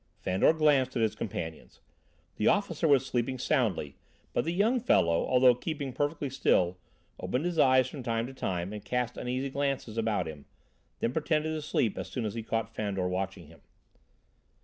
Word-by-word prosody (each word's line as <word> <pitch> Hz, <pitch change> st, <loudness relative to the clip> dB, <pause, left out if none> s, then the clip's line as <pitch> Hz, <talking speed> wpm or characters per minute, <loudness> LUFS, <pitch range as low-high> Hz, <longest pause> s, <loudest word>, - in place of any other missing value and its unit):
Fandor 95 Hz, +8 st, +3 dB
glanced 145 Hz, -5 st, +3 dB
at 115 Hz, -, +2 dB
his 110 Hz, -, +1 dB
companions. 80 Hz, -6 st, -6 dB, 0.6 s
The 105 Hz, -, +1 dB
officer 175 Hz, -5 st, +2 dB
was 135 Hz, -3 st, +4 dB
sleeping 130 Hz, +1 st, -1 dB
soundly, 120 Hz, -, 0 dB, 0.4 s
but -, -, 0 dB
the 165 Hz, -, 0 dB
young 215 Hz, +8 st, +2 dB
fellow, 85 Hz, -, +3 dB
although 125 Hz, -1 st, +6 dB
keeping 140 Hz, +1 st, -4 dB
perfectly 145 Hz, -1 st, -2 dB
still, 90 Hz, -9 st, +2 dB, 0.4 s
opened 130 Hz, +6 st, -2 dB
his 175 Hz, -2 st, -1 dB
eyes 130 Hz, -2 st, +5 dB
from 135 Hz, +1 st, -7 dB
time 115 Hz, -2 st, -1 dB
to 130 Hz, -, -8 dB
time 95 Hz, -5 st, -3 dB
and 105 Hz, -1 st, -7 dB
cast 125 Hz, -1 st, -2 dB
uneasy 130 Hz, +2 st, -3 dB
glances 135 Hz, -5 st, -2 dB
about 110 Hz, -5 st, 0 dB
him, 75 Hz, -3 st, -9 dB, 0.6 s
then 115 Hz, -, 0 dB
pretended 155 Hz, 0 st, 0 dB
to 155 Hz, -, -3 dB
sleep 120 Hz, -7 st, 0 dB
as -, -, -4 dB
soon 120 Hz, -4 st, -3 dB
as 105 Hz, -, -3 dB
he 115 Hz, -, -4 dB
caught 115 Hz, 0 st, -3 dB
Fandor 100 Hz, -4 st, -2 dB
watching 95 Hz, -1 st, -3 dB
him. 80 Hz, 0 st, -17 dB
125 Hz, 175 wpm, -29 LUFS, 105-145 Hz, 0.6 s, although